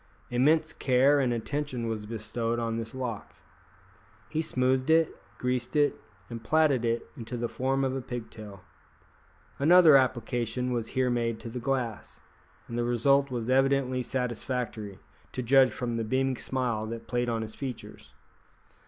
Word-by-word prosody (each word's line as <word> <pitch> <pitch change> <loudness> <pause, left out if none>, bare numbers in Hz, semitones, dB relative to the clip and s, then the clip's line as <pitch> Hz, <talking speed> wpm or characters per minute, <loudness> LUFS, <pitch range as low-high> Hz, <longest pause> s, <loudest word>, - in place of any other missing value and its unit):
Immense 155 +6 +3
care 135 +3 +3
and 130 -3 +1
attention 125 0 -3
was 110 -2 -4
bestowed 115 +1 -2
on 115 -1 -1
this 115 +1 -5
lock. 125 -5 -5 0.9
He 155 - -1
smoothed 130 -2 0
it, 160 0 +4 0.2
greased 125 +2 -2
it, 145 -2 +2 0.3
and 115 -1 -8
plaited 155 -5 +3
it 115 0 0
into 120 -2 -6
the 120 0 -1
form 135 +3 -1
of 130 0 0
a 135 - -2
pigtail. 110 -6 -8 1.0
Another 165 +1 +7
application 125 -1 -1
was 115 -2 -2
here 130 -1 +2
made 115 -2 -1
to 115 - -7
the 125 +2 -5
glass, 125 -4 -3 0.5
and 120 0 -4
the - - +1
result 135 +4 +3
was 120 -3 -3
evidently 135 0 +2
satisfactory, 120 -4 -3 0.4
to 125 - -3
judge 130 +2 +5
from 120 +1 -3
the 115 - -1
beaming 130 +3 0
smile 120 -5 -2
that 115 0 -6
played 120 0 -1
on 115 -1 -1
his 110 0 -7
features. 130 -4 -8
125 Hz, 155 wpm, -28 LUFS, 115-135 Hz, 1.0 s, Another